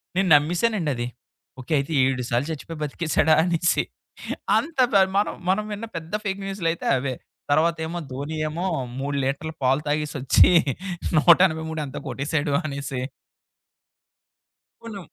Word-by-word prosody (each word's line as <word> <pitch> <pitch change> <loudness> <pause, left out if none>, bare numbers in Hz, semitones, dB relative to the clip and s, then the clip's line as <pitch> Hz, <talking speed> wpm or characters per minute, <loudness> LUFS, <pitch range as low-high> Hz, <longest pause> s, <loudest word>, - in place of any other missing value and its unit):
నేను 190 +1 +2
నమ్మసానండి 170 +3 +1
అది. 120 0 -3 0.5
ఓకే 130 +5 -4
అయితే 140 +4 -4
7 130 -1 0
సార్లు 120 +5 0
చచ్చిపోయి 160 +1 -7
బతికేసాడా 155 +1 +1
అనేసి. 175 0 +1 0.7
అంత 325 -1 -3 0.4
మనం 205 - +1 0.2
మనం 195 +3 +2
విన్న 210 +2 -4
పెద్ద 165 +2 -9
ఫేక్ 195 0 -2
న్యూస్‌లయితే 170 -4 -2
అవే. 130 0 -2 0.4
తర్వాతేమో 160 +2 +1
ధోని 140 +4 -5
ఏమో 165 +4 -3 0.3
3 140 +1 -2
లీటర్లు 140 +4 -2
పాలు 135 +3 +3
తాగేసోచ్చి. 145 0 +3 0.7
183 160 -1 +4
ఎంతో 135 0 -7
కొట్టసాడు 145 +1 -1
అనేసి. 140 -3 -4 1.8
కొన్ని 225 -3 -7
160 Hz, 120 wpm, -24 LUFS, 140-175 Hz, 1.8 s, 183